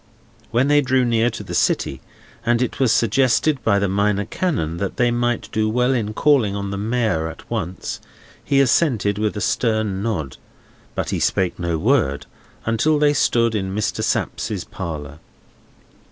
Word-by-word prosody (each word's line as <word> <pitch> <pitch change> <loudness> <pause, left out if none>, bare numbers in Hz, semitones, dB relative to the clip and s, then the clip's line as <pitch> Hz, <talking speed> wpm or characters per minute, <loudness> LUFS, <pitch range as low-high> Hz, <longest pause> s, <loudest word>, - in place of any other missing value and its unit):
When 125 +3 +2
they 145 0 +4
drew 130 -1 +2
near 115 0 +2
to 110 -2 -7
the 90 -3 -7
city, 65 -5 0 0.4
and 120 0 +2
it 125 +2 -2
was 130 -4 +3
suggested 130 +5 +2
by 100 -3 +3
the 100 0 +1
Minor 100 +1 +1
Canon 85 - -2
that 100 +1 -3
they 120 -1 +3
might 120 0 -1
do 110 0 0
well 125 +3 +2
in 110 -4 -2
calling 130 -9 +3
on 100 -1 -4
the 100 - -3
Mayor 110 -7 0
at 80 - -10
once, 95 -6 -4 0.4
he 140 -1 +2
assented 115 -7 +2
with 105 0 -1
a - - -3
stern 110 -4 0
nod; 95 - -3 0.6
but - - -2
he - - -1
spake 90 -2 0
no 85 -2 -1
word 100 - +1 0.4
until 115 +8 +2
they 145 0 +3
stood 115 -4 +2
in 95 -2 -2
Mr. 105 - -1
Sapsea's - - -2
parlour. 75 -2 -7
110 Hz, 170 wpm, -21 LUFS, 100-125 Hz, 0.6 s, they